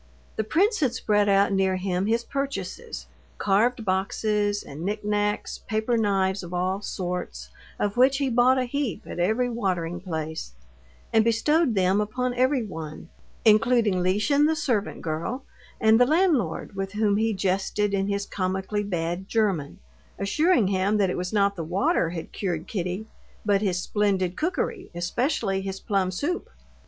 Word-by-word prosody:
The 220 - 0
prince 395 - +2
had 260 -6 +1
spread 205 -3 +2
out 200 0 +4
near 190 -1 +2
him 185 +1 -1
his 230 +2 +1
purchases, 195 - -4 0.3
carved 225 +4 +2
boxes, 205 +2 0
and 140 +3 -9
knick 210 +2 -3
knacks, 210 0 -1
paper 220 +2 0
knives 195 -3 +1
of 175 0 -6
all 185 +2 -1
sorts, 180 - -4 0.3
of 205 +2 -1
which 265 +2 +5
he 280 -1 0
bought 250 +1 +4
a 260 - +2
heap 260 - -3
at - - -7
every 220 +8 +2
watering 185 -7 -2
place, 160 - -5 0.6
and 220 - +5
bestowed 245 +4 +2
them 190 +2 +3
upon 250 +4 -1
everyone, 215 - -2 0.4
including 220 -3 +4
Lieschen, 215 +11 +3
the 320 - +1
servant 245 -9 -1
girl, 170 - -3 0.3
and 220 0 +5
the 245 - +6
landlord, 295 - +1
with 195 0 -4
whom 210 -1 +2
he 225 +1 +1
jested 195 +1 0
in 195 0 +1
his 200 0 -1
comically 190 +2 -2
bad 175 -1 -3
German, 195 -10 0 0.4
assuring 235 - +2
him 195 +2 +1
that 195 -3 +2
it - - -2
was 180 0 -3
not 200 -1 +2
the 170 - -4
water 170 0 +1
had 165 -1 -6
cured 175 -5 -3
Kitty, 185 +1 -3 0.4
but 200 -1 +3
his 185 -4 0
splendid 190 -3 0
cookery, 370 +4 -2
especially 195 - 0
his 195 0 -5
plum 195 -4 0
soup. 290 - -3
205 Hz, 155 wpm, -25 LUFS, 185-230 Hz, 0.6 s, the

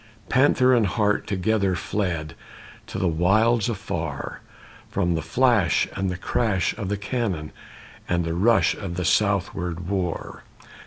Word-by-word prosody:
Panther 130 -1 +4
and 115 -4 +3
hart 105 +2 0
together 100 -1 +1
Fled 85 -4 -2 0.5
to - - -6
the 95 - +1
wilds 105 +7 +2
afar, 85 - -4 0.5
From 85 0 0
the 80 - -1
flash 110 +2 +2
and 95 -1 -1
the 90 - -3
crash 95 -2 0
of 100 -4 -4
the 105 - -1
cannon 95 -7 -3 0.6
And 85 -1 +1
the 85 - -2
rush 110 +7 +3
of 95 -4 -6
the 90 -1 -2
southward 90 -3 0
war. 90 -3 -3
95 Hz, 140 wpm, -24 LUFS, 85-110 Hz, 0.6 s, Panther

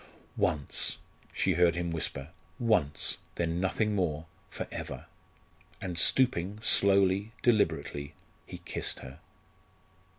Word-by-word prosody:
"Once!" 70 -3 +2 0.3
she 95 - +1
heard 85 0 +3
him 85 0 -2
whisper. 75 -3 -3 0.3
"Once! 110 - +1 0.2
Then 85 0 -1
nothing 105 +3 0
more 80 -6 -1 0.2
for - - -6
ever." - - -6 0.7
And 90 -3 -5
stooping, 100 0 +3
slowly, 100 0 +3
deliberately, 75 - 0 0.3
he - - -8
kissed - - -2
her. 65 +4 -11
90 Hz, 105 wpm, -30 LUFS, 80-100 Hz, 0.7 s, heard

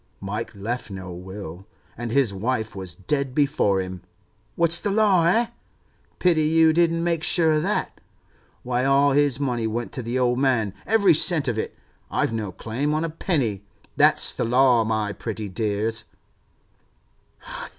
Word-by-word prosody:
Mike 110 +3 -5
left 110 +4 -4
no 95 -2 -8
will, 95 0 -9 0.3
and 120 +1 -5
his 125 -3 +1
wife 110 +1 -3
was 95 -3 -6
dead 130 +8 -2
before 140 -10 +1
him. 95 -1 -6 0.5
What's 170 0 +4
the 205 - -1
law, 200 -4 +3
eh? 230 +7 +3 0.7
Pity 170 -3 +2
you 160 +1 +4
didn't 165 0 +2
make 170 -2 0
sure 165 -2 +3
of 155 0 +2
that. 195 +6 -2 0.6
Why, 125 0 -1
all 140 +1 +3
his 140 -2 +2
money 120 -5 -1
went 120 +2 -4
to 130 - -6
the 120 +2 -3
old 125 -1 +1
man, 125 -7 +1
every 200 -5 +4
cent 155 -1 +4
of 115 -3 -1
it. - - -5 0.3
I've - - -1
no 105 -4 -3
claim 130 +10 -3
on 155 - -1
a 165 - -3
penny. 135 - -1 0.3
That's - - +4
the - - -2
law, 125 0 +3
my 110 -2 -2
pretty 110 +1 -6
dears! 110 +2 -1
125 Hz, 160 wpm, -23 LUFS, 105-155 Hz, 0.7 s, What's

